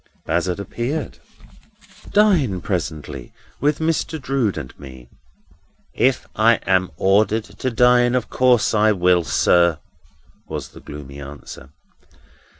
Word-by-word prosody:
Bazzard 90 -1 -1
reappeared. 120 +9 -4 0.9
"Dine 170 - +3
presently 80 - -5 0.3
with 145 0 +1
Mr. 160 0 -1
Drood 135 -7 -1
and - - -7
me." 65 -3 -12 0.8
"If 130 0 +1
I 115 +2 +5
am 95 -1 +2
ordered 105 +3 +2
to 130 - -5
dine, 125 +1 +3
of 125 -2 -1
course 125 -3 +2
I 110 0 +4
will, 90 -2 +3
sir," 85 0 +3 0.7
was - - -6
the - - -14
gloomy 70 -1 -10
answer. 70 -2 -10
105 Hz, 115 wpm, -20 LUFS, 85-125 Hz, 0.9 s, I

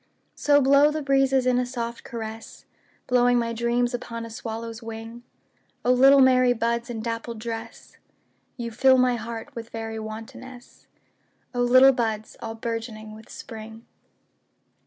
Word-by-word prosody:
So 290 -1 +3
blow 280 +2 +5
the 305 0 -3
breezes 270 -1 +2
in 250 -1 +3
a 250 - 0
soft 235 -2 -5
caress, 225 -1 -8 0.4
Blowing 245 0 +3
my 230 -1 -1
dreams 240 +1 0
upon 230 -1 -5
a 230 - -10
swallow's 225 0 -6
wing;O 230 +2 -6
little 270 +2 +6
merry 255 -1 +5
buds 235 +1 -1
in 230 -2 -4
dappled 230 0 -4
dress, 225 0 -7 0.6
You 235 -2 -5
fill 260 +3 +4
my 250 -1 +3
heart 230 +4 -7
with 230 -2 -8
very 225 -1 -5
wantonness—O 245 +2 -10
little 255 +2 +7
buds 220 -3 -3
all 225 -1 -5
bourgeoning 225 -1 -5
with 220 +1 -14
Spring! 225 0 -10
235 Hz, 135 wpm, -25 LUFS, 225-250 Hz, 0.6 s, little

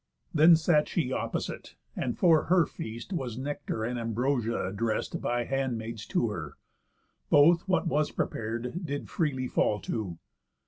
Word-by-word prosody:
Then 160 +2 +7
sat 160 -2 +3
she 140 -7 -1
opposite, - - -4 0.2
and 120 - -2
for 165 -4 +4
her 180 -2 +4
feast 115 - -7
Was 125 -9 -3
nectar 130 -4 -3
and 120 +2 -2
ambrosia 115 -3 -1
addrest 110 +1 -2
By 120 0 0
handmaids 115 -4 -3
to 115 - +1
her. 80 -7 -6 0.7
Both, 165 +5 +5
what 185 0 +2
was 155 -2 +1
prepar'd, 120 - -3
Did 145 -3 -4
freely 135 -6 0
fall 105 -3 +1
to. 95 -7 -4
125 Hz, 140 wpm, -29 LUFS, 115-155 Hz, 0.7 s, Then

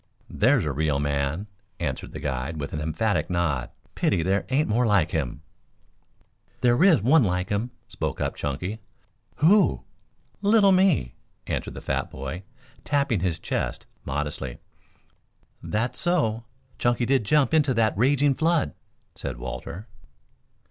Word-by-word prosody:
"There's 125 - +3
a 75 - 0
real 75 +1 0
man," 70 +5 -1 0.3
answered 70 -7 -3
the 75 - -7
guide, 70 +1 -3
with 70 -1 -5
an 75 - -3
emphatic 80 +2 0
nod. 80 -8 0 0.2
"Pity 85 - +1
there 95 +3 0
aren't 140 +4 +2
more 115 +3 +2
like 95 -6 +3
him." 75 -2 -3 1.2
"There 120 +5 +4
is 175 - +5
one 140 +4 +5
like 90 -1 -1
him," 105 +4 -1 0.2
spoke - - -4
up - - -1
Chunky. 90 +10 -3 0.6
"Who?" 195 +7 +4 0.6
"Little 205 -1 +5
me," 185 - +3 0.3
answered - - -3
the - - -7
fat - - -2
boy, 70 +6 -6 0.4
tapping 140 -7 +1
his 85 -2 -1
chest - - -3 0.2
modestly. 70 -2 -3 1.0
"That's 115 +4 -2
so; 120 -11 0 0.3
Chunky 120 0 +1
did 135 -1 +2
jump 145 +7 +2
into 145 -5 +3
the 110 -1 +3
raging 140 +5 +3
flood," 165 +2 +1 0.4
said - - -6
Walter. 80 - -7
100 Hz, 135 wpm, -25 LUFS, -, 1.2 s, is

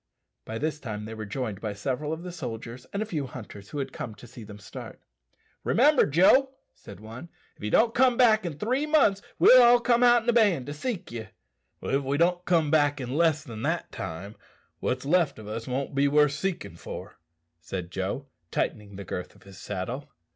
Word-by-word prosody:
By 110 - -5
this 150 +3 -2
time 105 -6 -5
they 110 - -7
were 110 -1 -6
joined 105 -4 -4
by 105 -2 -3
several 130 +8 -3
of 160 +2 -4
the 180 - -6
soldiers 125 -5 -7
and 200 +2 -1
a - - -6
few 155 -10 -3
hunters 100 -5 -10
who - - -6
had 135 -1 -3
come 110 -3 -6
to 115 - -13
see 120 -1 -11
them 105 -1 -10
start. 105 - -10 0.6
"Remember, 290 +4 +4
Joe," 260 - +4 0.2
said 100 -2 -13
one, 115 +10 -10 0.3
"if - - -16
you 105 - -1
don't 225 - +4
come 250 -1 +4
back 220 -4 +5
in 165 -5 -4
three 255 - 0
months 270 -11 +4 0.2
we'll 255 0 +8
all 240 0 +7
come 240 0 +2
out 240 -1 +6
in 240 - -1
a - - +4
band 205 - +3
to 145 - -5
seek 200 - -4
you." 115 -2 -6 0.6
"If 135 +1 +1
we 140 +1 -1
don't 175 +2 +2
come 165 -4 +2
back 145 -2 +3
in 125 -2 -5
less 160 -1 +2
than 115 -7 -8
that - - -2
time, 95 +6 -6 0.4
what's 125 +1 -2
left 170 +1 +2
o' 110 -1 -10
us 115 +2 -5
won't 130 +2 -3
be 140 +1 +3
worth 150 0 +4
seekin' 155 - -4
for," - - -9 0.4
said 85 +1 -6
Joe, 95 +9 -3 0.2
tightening 100 +2 -3
the 100 0 -7
girth 90 - -6
of - - -20
his 100 0 -13
saddle. 105 +8 -5
140 Hz, 210 wpm, -27 LUFS, 110-180 Hz, 0.6 s, we'll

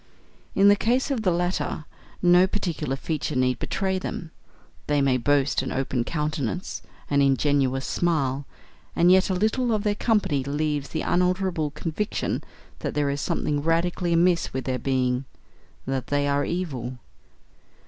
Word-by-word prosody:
In 195 +1 +5
the 205 - +7
case 245 +7 +1
of 255 -5 0
the 195 - +2
latter, 175 -2 -1 0.4
no 180 +1 +6
particular 175 -9 -2
feature 150 +1 -3
need 125 -1 +1
betray 190 -1 -1
them; 170 -3 -5 0.6
they 145 -1 +2
may 135 -2 +3
boast 140 +2 +2
an 130 - -4
open 130 -2 -1
countenance 150 +2 -3 0.3
and 140 0 +2
an 140 - +5
ingenuous 135 -1 +1
smile; 140 -5 0 0.5
and 175 +1 +5
yet 190 +1 +5
a 190 - +1
little 220 +5 +1
of 215 -2 0
their 210 -1 +2
company 205 - +1
leaves 145 0 -1
the 160 - -3
unalterable 180 -3 +1
conviction 160 +7 -3 0.4
that - - -4
there 145 -1 +1
is 140 0 -3
something 145 -1 -1
radically 170 +2 0
amiss 170 0 +3
with 130 0 -2
their 130 -1 -1
being: 130 0 0 0.6
that 135 -1 -2
they 145 0 +1
are 145 0 +1
evil. 130 -9 -3
150 Hz, 155 wpm, -25 LUFS, 135-180 Hz, 0.6 s, the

